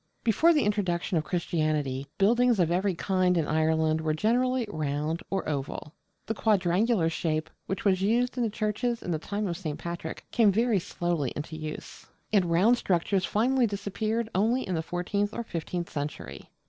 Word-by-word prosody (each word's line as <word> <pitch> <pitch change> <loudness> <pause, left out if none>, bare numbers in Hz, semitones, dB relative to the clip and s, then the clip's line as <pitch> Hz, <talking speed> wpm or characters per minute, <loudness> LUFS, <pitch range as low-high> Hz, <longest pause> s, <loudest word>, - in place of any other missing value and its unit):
Before 235 +9 +4
the 300 -4 +3
introduction 190 -4 0
of - - -3
Christianity, 155 -6 -1
buildings 235 +2 +4
of 170 -2 +3
every 185 +1 +1
kind 185 0 +1
in 160 - +1
Ireland 160 0 +2
were 155 -1 0
generally 245 +6 +1
round 155 -1 -2
or 195 -1 -2
oval. 145 +1 -4 0.3
The 225 - -1
quadrangular 205 -2 +2
shape, 160 -1 -1 0.2
which 195 +2 -3
was 190 -2 +3
used 240 +5 +2
in 250 - -1
the 230 - +1
churches 220 +3 -2
in 180 - -3
the 160 - 0
time 205 +5 -3
of 175 -3 -2
St. 155 -5 -4
Patrick, 170 -1 -6
came 220 -4 +4
very 225 0 +2
slowly 170 -6 -2
into 150 +2 -5
use; 155 -1 -7 0.3
and 195 -4 +4
round 190 +9 +4
structures 185 +1 +1
finally 245 +6 +2
disappeared 215 +3 -2
only 230 +7 +1
in 185 - -2
the 160 - 0
fourteenth 200 +5 -2
or 235 - -2
fifteenth 175 -3 -4
century. 145 0 -6
185 Hz, 175 wpm, -28 LUFS, 160-215 Hz, 0.3 s, Before